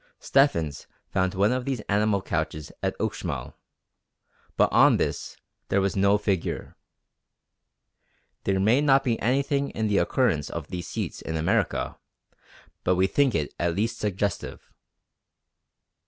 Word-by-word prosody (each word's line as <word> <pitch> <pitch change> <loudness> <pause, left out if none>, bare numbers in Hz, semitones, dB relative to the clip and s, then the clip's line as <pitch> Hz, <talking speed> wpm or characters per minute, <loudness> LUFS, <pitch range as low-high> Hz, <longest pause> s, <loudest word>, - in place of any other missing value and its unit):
Stephens 85 - +1 0.2
found 95 -1 0
one 100 +4 +3
of 130 0 -1
these 135 -2 -2
animal 105 -1 +1
couches 80 -4 -3
at - - -2
Uxmal, - - -3 1.0
but - - +5
on - - +6
this - - -3 0.3
there 100 - +3
was 95 0 0
no 100 +1 +4
figure. 100 -4 -2 1.7
There 95 -1 +1
may 110 +8 +4
not 135 -2 +4
be 115 -3 0
anything 140 +3 +1
in 110 -1 -2
the 100 - +3
occurrence 95 - +1
of 80 -3 -6
these 90 -2 -5
seats - - -4
in 80 - -4
America; 80 - 0 0.8
but 90 - +2
we 95 +1 +3
think 135 +5 +2
it 75 -3 -1
at 85 -1 0
least 110 +4 -1
suggestive. 100 -2 -3
100 Hz, 135 wpm, -26 LUFS, 90-120 Hz, 1.7 s, on